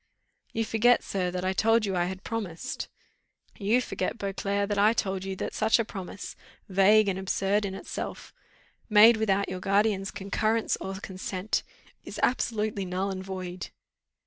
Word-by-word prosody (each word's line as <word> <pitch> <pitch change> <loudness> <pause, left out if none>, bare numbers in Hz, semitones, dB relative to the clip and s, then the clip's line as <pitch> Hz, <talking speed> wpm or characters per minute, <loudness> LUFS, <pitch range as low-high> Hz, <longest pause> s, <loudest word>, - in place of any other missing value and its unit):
"You 225 0 -1
forget 235 +3 +4
sir, 185 -2 -1
that 180 +1 -3
I 190 - +1
told 225 +3 +3
you 195 -2 -1
I 175 -1 +2
had 185 +1 -5
promised." 225 +1 -4 0.7
"You 215 +4 +3
forget, 245 - -3
Beauclerc, 200 0 -1
that 205 -1 -1
I 210 +2 +5
told 190 -4 -1
you 195 0 -4
that - - -4
such 220 0 +3
a 230 - 0
promise, 195 -2 -7 0.3
vague 200 +2 +5
and 190 -1 0
absurd 195 +2 +1
in 190 -1 -4
itself, - - -6 0.6
made 220 +2 +8
without 200 -2 +1
your 185 - -4
guardian's 195 0 +1
concurrence 215 +3 0
or 190 0 -5
consent, 190 +1 -3 0.4
is - - -8
absolutely 215 -5 0
null 185 +2 -2
and 190 0 -5
void." 185 -1 -6
200 Hz, 160 wpm, -28 LUFS, 190-215 Hz, 0.7 s, made